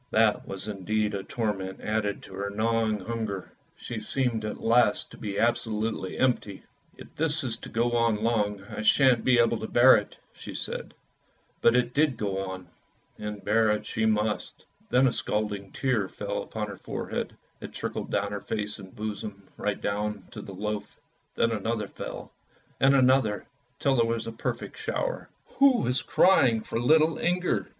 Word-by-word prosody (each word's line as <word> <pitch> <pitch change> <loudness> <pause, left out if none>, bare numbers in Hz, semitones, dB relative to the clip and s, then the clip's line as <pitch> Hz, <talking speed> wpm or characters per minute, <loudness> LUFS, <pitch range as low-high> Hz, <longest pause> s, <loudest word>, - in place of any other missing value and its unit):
That 110 -1 +3
was 95 +2 -5
indeed 105 +1 -1
a 100 - -2
torment 95 -3 -3
added 105 -1 -1
to - - -12
her 100 +1 -3
gnawing 110 0 0
hunger; 110 -3 -4 0.2
she 120 - -6
seemed 115 0 -1
at 105 - -4
last 120 +1 +3
to - - -12
be 100 -2 -4
absolutely 110 -4 0
empty. 120 -6 0 0.2
" - - -34
If - - -13
this 155 0 0
is 120 -3 -2
to - - -10
go 120 +2 +1
on 115 -2 +2
long 105 -3 +1
I 105 - -6
shan't 125 +1 +5
be 125 -1 +4
able 115 -1 +3
to 110 - -4
bear 125 +2 +7
it," 105 - -5 0.2
said - - -8
she; - - -5 0.7
but 115 - +5
it 125 0 +2
did 150 -1 +2
go 100 -2 -1
on, 95 -1 -6 0.5
and 105 -1 -6
bear 110 +1 +3
it 105 0 0
she 110 -1 0
must. 105 0 -1 0.2
Then 130 +2 +4
a 125 - +3
scalding 105 -2 -2
tear 125 -7 0
fell - - -4
upon - - -4
her - - -7
forehead, - - -4 0.2
it - - -8
trickled - - -4
over 100 - +1
her 100 -1 -4
face 105 -1 -3
and 95 -1 -12
bosom 105 -1 -5
right 105 -1 -2
down 105 +1 -2
to 105 - -7
the 100 -1 -9
loaf; 105 +2 -4 0.4
then 115 - +2
another 110 0 -1
fell, - - -7 0.5
and 135 +1 +5
another, 130 -6 +3 0.3
till 140 -2 +2
there 115 - +4
was 115 0 -1
a 115 - -4
perfect 115 - -4
shower. - - -2 0.3
Who 275 -2 +7
was 125 +1 +1
crying 125 -12 +4
for 115 - -3
little 155 +5 +4
Inger! 180 +1 0
110 Hz, 175 wpm, -27 LUFS, 105-120 Hz, 0.7 s, bear